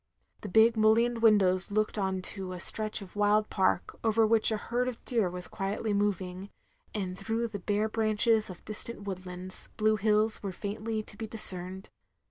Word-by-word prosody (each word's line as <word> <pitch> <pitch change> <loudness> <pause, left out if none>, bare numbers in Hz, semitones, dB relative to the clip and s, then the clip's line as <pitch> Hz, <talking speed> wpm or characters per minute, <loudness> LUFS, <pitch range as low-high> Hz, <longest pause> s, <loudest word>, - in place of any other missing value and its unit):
The 205 - -6
big 220 +4 +5
mullioned 225 +2 +3
windows 190 -4 +4
looked 215 +1 0
on 190 -3 -1
to 190 -2 -3
a 180 - -7
stretch 215 +2 -2
of 190 - -13
wild 210 +1 +2
park, 190 -2 0
over 225 0 +3
which 220 0 +4
a 220 - 0
herd 245 +4 -2
of 250 -2 -6
deer 225 -7 +1
was 180 0 -4
quietly 205 +2 -2
moving; 195 -2 -1 0.4
and 190 -4 -3
through 225 +4 -2
the 205 -2 -6
bare 205 +3 0
branches 220 0 +2
of 180 - -11
distant 215 0 -5
woodlands, 185 -1 -3
blue 215 0 +3
hills 215 +1 +3
were 195 - -4
faintly 215 +3 -4
to 210 - -13
be 220 +1 -6
discerned. 190 -3 -2
210 Hz, 175 wpm, -29 LUFS, 190-220 Hz, 0.4 s, big